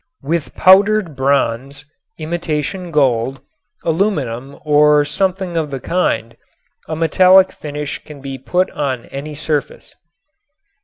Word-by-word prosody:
With 160 Hz, +2 st, -2 dB
powdered 195 Hz, -3 st, +4 dB
bronze, 135 Hz, +1 st, 0 dB, 0.3 s
imitation 170 Hz, +2 st, -3 dB
gold, 135 Hz, -4 st, +1 dB, 0.4 s
aluminum 145 Hz, -, -1 dB
or 150 Hz, 0 st, +4 dB
something 185 Hz, +3 st, -1 dB
of 160 Hz, -2 st, -1 dB
the 135 Hz, -1 st, -5 dB
kind 125 Hz, -9 st, -1 dB, 0.5 s
a 160 Hz, -, -3 dB
metallic 185 Hz, +4 st, +5 dB
finish 150 Hz, 0 st, -6 dB
can 150 Hz, -2 st, -12 dB
be 135 Hz, -1 st, -7 dB
put 180 Hz, +8 st, 0 dB
on 130 Hz, -4 st, -3 dB
any 145 Hz, +2 st, -7 dB
surface. 150 Hz, -1 st, -3 dB
150 Hz, 110 wpm, -17 LUFS, 140-175 Hz, 0.5 s, metallic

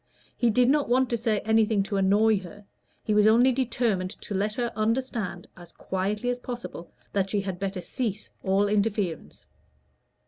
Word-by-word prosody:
He 240 Hz, -, +2 dB
did 245 Hz, +3 st, +3 dB
not 285 Hz, -1 st, +2 dB
want 255 Hz, +1 st, +2 dB
to -, -, +2 dB
say 220 Hz, -2 st, 0 dB
anything 220 Hz, -2 st, +2 dB
to 200 Hz, +1 st, -4 dB
annoy 205 Hz, +2 st, +3 dB
her: 200 Hz, +2 st, -12 dB, 0.4 s
he 215 Hz, -, 0 dB
was 210 Hz, 0 st, +5 dB
only 240 Hz, +4 st, +5 dB
determined 235 Hz, -7 st, 0 dB
to 205 Hz, -, -8 dB
let 205 Hz, +2 st, -1 dB
her 240 Hz, -1 st, -2 dB
understand, 220 Hz, -5 st, -2 dB
as 175 Hz, -2 st, -14 dB
quietly 205 Hz, +6 st, -2 dB
as 245 Hz, -, -4 dB
possible, 240 Hz, -8 st, -7 dB, 0.2 s
that 195 Hz, -1 st, 0 dB
she 205 Hz, 0 st, 0 dB
had 190 Hz, -2 st, -5 dB
better 190 Hz, -2 st, -3 dB
cease 220 Hz, -1 st, -4 dB
all 195 Hz, +2 st, +2 dB
interference. 205 Hz, -5 st, -1 dB
210 Hz, 170 wpm, -26 LUFS, 195-235 Hz, 0.4 s, was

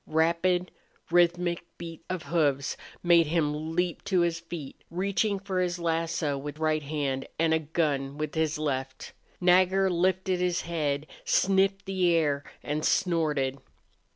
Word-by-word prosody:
Rapid, 170 Hz, +3 st, +1 dB, 0.4 s
rhythmic 175 Hz, 0 st, +2 dB
beat 165 Hz, -2 st, -8 dB
of 180 Hz, -3 st, -3 dB
hoofs 145 Hz, -5 st, +1 dB, 0.3 s
made 170 Hz, -2 st, +5 dB
him 155 Hz, 0 st, -1 dB
leap 180 Hz, -1 st, 0 dB
to 185 Hz, -3 st, +2 dB
his 170 Hz, -1 st, +1 dB
feet, 165 Hz, -5 st, -8 dB
reaching 200 Hz, +3 st, 0 dB
for 190 Hz, -1 st, -3 dB
his 180 Hz, -1 st, 0 dB
lasso 165 Hz, -4 st, -1 dB
with 145 Hz, +1 st, -6 dB
right 155 Hz, -1 st, +1 dB
hand 140 Hz, -2 st, -2 dB
and 160 Hz, 0 st, +2 dB
a 160 Hz, -, +3 dB
gun 145 Hz, -3 st, -1 dB
with 150 Hz, -1 st, -3 dB
his 160 Hz, -1 st, 0 dB
left. 135 Hz, -3 st, -3 dB, 0.3 s
Nagger 185 Hz, +1 st, +4 dB
lifted 185 Hz, +1 st, +1 dB
his 180 Hz, -1 st, +1 dB
head, 150 Hz, -4 st, -2 dB, 0.2 s
sniffed 195 Hz, +1 st, +2 dB
the 190 Hz, -2 st, +1 dB
air, 145 Hz, -3 st, +1 dB, 0.2 s
and 150 Hz, +1 st, -2 dB
snorted. 150 Hz, -8 st, +1 dB
165 Hz, 140 wpm, -28 LUFS, 150-180 Hz, 0.4 s, made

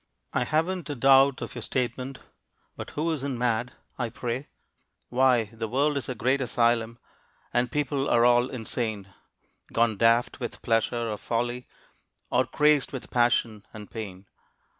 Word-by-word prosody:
I 125 Hz, -, +1 dB
haven't 165 Hz, +4 st, -1 dB
a 145 Hz, -, -2 dB
doubt 135 Hz, +1 st, +5 dB
of -, -, -7 dB
your -, -, -6 dB
statement, 130 Hz, +1 st, -3 dB, 0.5 s
But -, -, -7 dB
who 165 Hz, +2 st, +1 dB
isn't 140 Hz, -4 st, -2 dB
mad, 120 Hz, 0 st, 0 dB, 0.3 s
I 120 Hz, -2 st, -1 dB
pray? 120 Hz, +4 st, -4 dB, 0.6 s
Why, 125 Hz, -4 st, +3 dB
the 115 Hz, 0 st, -4 dB
world 140 Hz, +6 st, +1 dB
is 140 Hz, -, -3 dB
a 130 Hz, -, -3 dB
great 130 Hz, +4 st, +1 dB
asylum, 115 Hz, -1 st, +1 dB, 0.6 s
And 120 Hz, 0 st, +1 dB
people 145 Hz, -1 st, -1 dB
are 120 Hz, 0 st, +4 dB
all 120 Hz, +1 st, +4 dB
insane, 110 Hz, -5 st, -4 dB, 0.6 s
Gone 115 Hz, -2 st, +2 dB
daft 115 Hz, +4 st, +3 dB
with 120 Hz, -3 st, -6 dB
pleasure 115 Hz, +1 st, +1 dB
or 105 Hz, -, -3 dB
folly, 120 Hz, +2 st, -2 dB, 0.6 s
Or -, -, +2 dB
crazed 150 Hz, -2 st, +3 dB
with 130 Hz, -, -7 dB
passion 120 Hz, -3 st, +2 dB
and 105 Hz, -1 st, -10 dB
pain. 100 Hz, -4 st, -7 dB
120 Hz, 150 wpm, -27 LUFS, 115-135 Hz, 0.6 s, doubt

